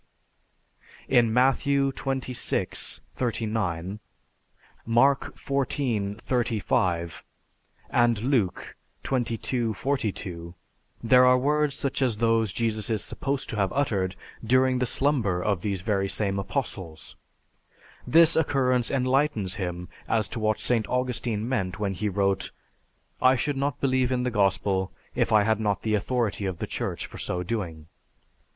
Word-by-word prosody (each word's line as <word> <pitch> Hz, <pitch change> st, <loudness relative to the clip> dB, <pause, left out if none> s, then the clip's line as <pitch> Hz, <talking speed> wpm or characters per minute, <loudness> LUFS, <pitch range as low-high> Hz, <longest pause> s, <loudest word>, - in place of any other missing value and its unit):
D. 135 Hz, -, -1 dB
In 120 Hz, -2 st, +5 dB
Matthew 135 Hz, +3 st, +2 dB
XXVI, 130 Hz, -2 st, -2 dB
39, 105 Hz, -6 st, -2 dB, 0.8 s
Mark 125 Hz, +5 st, +2 dB
XIV, 125 Hz, -7 st, -1 dB
35, 95 Hz, -, -1 dB, 0.7 s
and 120 Hz, -2 st, +3 dB
Luke 125 Hz, -8 st, 0 dB, 0.3 s
XXII, 120 Hz, -2 st, -1 dB
42, 95 Hz, -9 st, -3 dB, 0.5 s
there 125 Hz, +2 st, +6 dB
are 125 Hz, 0 st, +6 dB
words 145 Hz, +2 st, +1 dB
such 140 Hz, 0 st, -2 dB
as 125 Hz, -5 st, +1 dB
those 115 Hz, -2 st, +2 dB
Jesus 110 Hz, 0 st, -1 dB
is 110 Hz, -3 st, 0 dB
supposed 140 Hz, -1 st, -3 dB
to 110 Hz, -, -4 dB
have 100 Hz, -2 st, +1 dB
uttered 100 Hz, -9 st, 0 dB, 0.3 s
during 130 Hz, +2 st, +3 dB
the 125 Hz, -, 0 dB
slumber 120 Hz, -10 st, +1 dB
of 95 Hz, -1 st, 0 dB
these 100 Hz, -3 st, -2 dB
very 100 Hz, -2 st, 0 dB
same 100 Hz, -1 st, -1 dB
Apostles. 95 Hz, -4 st, -5 dB, 0.9 s
This 165 Hz, +1 st, +6 dB
occurrence 130 Hz, -6 st, +2 dB
enlightens 130 Hz, -6 st, +1 dB
him 90 Hz, -1 st, -4 dB, 0.2 s
as 110 Hz, -2 st, +2 dB
to 115 Hz, -, -4 dB
what 110 Hz, -1 st, 0 dB
St. 115 Hz, -4 st, +1 dB
Augustine 120 Hz, -3 st, -1 dB
meant 95 Hz, -9 st, -1 dB
when 100 Hz, -2 st, -1 dB
he 105 Hz, +3 st, -2 dB
wrote, 100 Hz, 0 st, 0 dB, 0.7 s
"I 130 Hz, +1 st, +6 dB
should 145 Hz, +3 st, -1 dB
not 140 Hz, 0 st, -1 dB
believe 130 Hz, -2 st, +1 dB
in 125 Hz, -1 st, 0 dB
the 125 Hz, -, -1 dB
Gospel 95 Hz, -2 st, +1 dB, 0.2 s
if -, -, 0 dB
I 105 Hz, -1 st, +5 dB
had 110 Hz, +1 st, +1 dB
not 105 Hz, -3 st, 0 dB
the 110 Hz, -, -1 dB
authority 105 Hz, -2 st, 0 dB
of 95 Hz, -2 st, -3 dB
the -, -, -3 dB
Church -, -, -3 dB
for -, -, -10 dB
so 90 Hz, 0 st, -2 dB
doing." 85 Hz, -6 st, -4 dB
115 Hz, 135 wpm, -26 LUFS, 100-130 Hz, 0.9 s, there